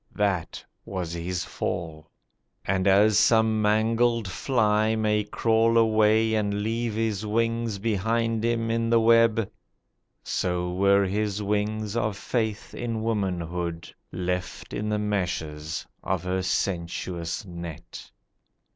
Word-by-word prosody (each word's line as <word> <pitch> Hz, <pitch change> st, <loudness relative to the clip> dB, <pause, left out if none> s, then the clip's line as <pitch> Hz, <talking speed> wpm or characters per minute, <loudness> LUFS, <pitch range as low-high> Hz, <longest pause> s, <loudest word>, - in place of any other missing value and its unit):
That 95 Hz, -4 st, -1 dB, 0.2 s
was 90 Hz, -4 st, -4 dB
his 90 Hz, +1 st, -3 dB
fall; 80 Hz, -2 st, -4 dB, 0.6 s
And 95 Hz, 0 st, +1 dB
as 105 Hz, +2 st, +5 dB
some 110 Hz, -1 st, +3 dB
mangled 115 Hz, +1 st, +2 dB
fly 110 Hz, -, +1 dB
may 105 Hz, -1 st, +1 dB
crawl 115 Hz, +2 st, +2 dB
away 110 Hz, 0 st, +4 dB
And 105 Hz, -1 st, 0 dB
leave 115 Hz, 0 st, -2 dB
his 110 Hz, -2 st, -1 dB
wings 115 Hz, 0 st, 0 dB
behind 115 Hz, +2 st, 0 dB
him 115 Hz, -1 st, 0 dB
in 115 Hz, 0 st, 0 dB
the 115 Hz, 0 st, +5 dB
web, 115 Hz, -1 st, +4 dB, 0.8 s
So 90 Hz, -1 st, -1 dB
were 100 Hz, +1 st, +4 dB
his 105 Hz, +1 st, -1 dB
wings 105 Hz, +1 st, -1 dB
of 110 Hz, -3 st, -1 dB
faith 110 Hz, -3 st, -2 dB
in 115 Hz, -2 st, -3 dB
womanhood 90 Hz, -6 st, -2 dB, 0.2 s
Left 90 Hz, 0 st, -4 dB
in 105 Hz, +1 st, -2 dB
the 105 Hz, -, +1 dB
meshes 85 Hz, -7 st, -3 dB, 0.2 s
of 95 Hz, -2 st, -2 dB
her 90 Hz, +1 st, -1 dB
sensuous 90 Hz, -1 st, -2 dB
net. 85 Hz, -1 st, -9 dB
105 Hz, 120 wpm, -26 LUFS, 90-110 Hz, 0.8 s, as